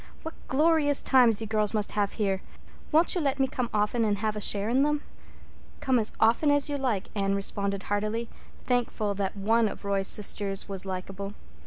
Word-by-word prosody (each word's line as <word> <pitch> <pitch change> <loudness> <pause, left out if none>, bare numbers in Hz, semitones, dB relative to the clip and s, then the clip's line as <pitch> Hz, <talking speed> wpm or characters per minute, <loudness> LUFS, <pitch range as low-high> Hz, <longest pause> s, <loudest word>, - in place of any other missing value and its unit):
What 320 - -6
glorious 295 0 +3
times 240 -5 +4
you - - -3
girls 215 0 0
must 210 -1 -1
have 205 -1 -1
here! 195 -3 -1 0.5
Won't 325 +2 +4
you 360 - -1
let 275 -2 0
me 270 - +4
come 250 -2 -3
often 210 +3 +1
and 210 -2 +1
have 215 +1 -2
a 210 - -4
share 205 0 +1
in 250 +4 +2
them?" 295 +1 +1 0.8
"Come 260 -2 +2
as 220 - 0
often 230 +7 +3
as 290 -1 +4
you 285 - -1
like," 235 -8 -1
Anne 195 -1 0
responded 200 0 -2
heartily, 215 +3 -2 0.4
thankful 240 -4 0
that 195 0 -3
one 225 +3 +2
of 205 - -8
Roy's 200 -1 0
sisters 200 -1 +1
was 195 -1 -5
likable. 195 +2 -6
215 Hz, 190 wpm, -27 LUFS, 200-255 Hz, 0.8 s, times